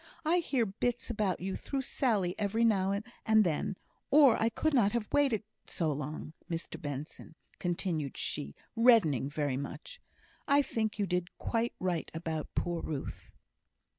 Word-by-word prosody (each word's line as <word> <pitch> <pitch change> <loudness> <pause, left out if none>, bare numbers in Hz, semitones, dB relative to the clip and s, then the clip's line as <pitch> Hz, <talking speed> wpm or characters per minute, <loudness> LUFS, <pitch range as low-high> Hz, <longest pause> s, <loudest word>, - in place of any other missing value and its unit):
I 335 +3 +4
hear 275 -8 +1
bits 240 +5 -1
about 210 -6 0
you 190 +1 -2
through 275 -1 -3
Sally 210 -10 +1
every 220 +3 +2
now 200 -2 +2 0.2
and 220 -1 +5
then, 175 +2 -1 0.3
or 280 -5 +7
I 225 - +4
could 315 +7 0
not 210 -6 +4
have 235 -3 -1
waited 270 -8 +3 0.2
so 160 -3 0
long. 150 +2 -5 0.2
Mr 165 0 -5
Benson," 145 +2 -6 0.2
continued 170 -5 -2
she, 70 +1 -3 0.2
reddening 215 - +5
very 145 -3 -1
much, 485 - -7 0.5
"I 285 0 +5
think 220 -5 -2
you 205 - +1
did 180 -1 -2
quite 230 0 -1
right 180 -3 -1
about 160 -2 -4
poor 175 -1 -1
Ruth." 145 -4 -5
195 Hz, 150 wpm, -32 LUFS, 160-235 Hz, 0.5 s, or